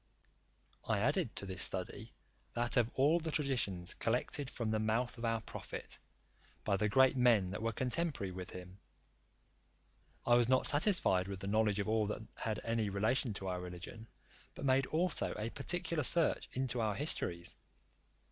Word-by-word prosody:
I -, -, +2 dB
added -, -, 0 dB
to -, -, -5 dB
this 95 Hz, -1 st, -3 dB
study, 100 Hz, +4 st, -2 dB, 0.4 s
that 120 Hz, +1 st, +1 dB
of 120 Hz, -3 st, +3 dB
all 150 Hz, +6 st, +4 dB
the 165 Hz, -1 st, -4 dB
traditions 120 Hz, -, -1 dB
collected 125 Hz, +4 st, -1 dB
from 115 Hz, -3 st, -3 dB
the 110 Hz, -, +1 dB
mouth 115 Hz, +3 st, 0 dB
of 115 Hz, -, -3 dB
our 115 Hz, -1 st, 0 dB
prophet, -, -, -7 dB, 0.6 s
by 100 Hz, -, +1 dB
the 105 Hz, +2 st, 0 dB
great 130 Hz, +3 st, +5 dB
men 115 Hz, -7 st, +4 dB
that 95 Hz, -, -5 dB
were 115 Hz, 0 st, 0 dB
contemporary 130 Hz, -, -1 dB
with 90 Hz, 0 st, -7 dB
him. 90 Hz, +1 st, -10 dB, 1.5 s
I 120 Hz, -, +4 dB
was 120 Hz, 0 st, +4 dB
not 130 Hz, 0 st, +4 dB
satisfied 145 Hz, -, +3 dB
with 100 Hz, -1 st, -5 dB
the 100 Hz, -, -4 dB
knowledge 105 Hz, 0 st, +2 dB
of 100 Hz, -, -1 dB
all 110 Hz, -1 st, +1 dB
that 105 Hz, +1 st, -4 dB
had 110 Hz, -2 st, -3 dB
any 115 Hz, -2 st, 0 dB
relation 110 Hz, +3 st, 0 dB
to 95 Hz, -, -5 dB
our 90 Hz, -1 st, -2 dB
religion, 90 Hz, +6 st, -8 dB, 0.5 s
but -, -, -6 dB
made 135 Hz, 0 st, +3 dB
also 170 Hz, +2 st, 0 dB
a 110 Hz, +2 st, -3 dB
particular 170 Hz, -2 st, 0 dB
search 165 Hz, +4 st, +4 dB
into 125 Hz, -2 st, -1 dB
our 105 Hz, -2 st, 0 dB
histories. 85 Hz, -, -2 dB
115 Hz, 165 wpm, -35 LUFS, 100-130 Hz, 1.5 s, great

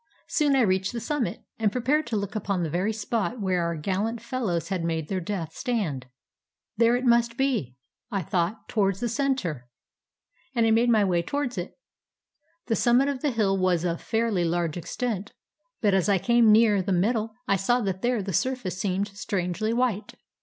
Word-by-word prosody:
Soon 290 Hz, -3 st, +2 dB
I 265 Hz, -, +4 dB
reached 190 Hz, -2 st, +1 dB
the 235 Hz, -, -3 dB
summit, 250 Hz, +2 st, -2 dB, 0.2 s
and 215 Hz, -2 st, +2 dB
prepared 275 Hz, +6 st, +1 dB
to 235 Hz, -, -2 dB
look 200 Hz, 0 st, -4 dB
upon 195 Hz, -3 st, -1 dB
the 160 Hz, -, -2 dB
very 185 Hz, +6 st, 0 dB
spot 225 Hz, +2 st, -2 dB
where 185 Hz, -3 st, 0 dB
our 170 Hz, 0 st, -1 dB
gallant 200 Hz, +8 st, -2 dB
fellows 215 Hz, -, -2 dB
had 185 Hz, -3 st, -1 dB
made 160 Hz, -2 st, -2 dB
their 190 Hz, -, -1 dB
death 170 Hz, -3 st, -4 dB
stand. 195 Hz, -, -2 dB, 0.7 s
There 230 Hz, +2 st, +4 dB
it 250 Hz, +1 st, -1 dB
must 235 Hz, 0 st, +3 dB
be, 240 Hz, -, 0 dB, 0.3 s
I 195 Hz, -3 st, -2 dB
thought, 185 Hz, +3 st, -1 dB
towards 195 Hz, -4 st, +1 dB
the 240 Hz, -, -1 dB
center. 230 Hz, -, -1 dB, 0.9 s
And 230 Hz, -1 st, +3 dB
I 225 Hz, -, +3 dB
made 230 Hz, +2 st, +4 dB
my 220 Hz, -3 st, +4 dB
way 175 Hz, -3 st, +2 dB
towards 280 Hz, +7 st, -2 dB
it. 175 Hz, -2 st, -6 dB, 0.9 s
The 230 Hz, -, 0 dB
simimit 250 Hz, +5 st, +3 dB
of 265 Hz, -2 st, -6 dB
the 295 Hz, -, +1 dB
hill 215 Hz, -6 st, +1 dB
was 185 Hz, -3 st, +1 dB
of 170 Hz, -1 st, -1 dB
fairly 225 Hz, -5 st, 0 dB
large 170 Hz, -2 st, 0 dB
extent; 205 Hz, +3 st, -4 dB, 0.5 s
but 205 Hz, -3 st, +3 dB
as 190 Hz, +1 st, +2 dB
I 200 Hz, -, +4 dB
came 235 Hz, +2 st, +4 dB
nearer 210 Hz, -2 st, +5 dB
the 190 Hz, -, -3 dB
middle, 215 Hz, +4 st, +1 dB
I 200 Hz, -, +3 dB
saw 220 Hz, +6 st, +2 dB
that 190 Hz, -3 st, -2 dB
there 240 Hz, -4 st, +1 dB
the 195 Hz, -1 st, -4 dB
surface 200 Hz, -4 st, -1 dB
seemed 195 Hz, +1 st, -1 dB
strangely 195 Hz, 0 st, -2 dB
white. 230 Hz, -3 st, -1 dB
210 Hz, 190 wpm, -26 LUFS, 185-235 Hz, 0.9 s, nearer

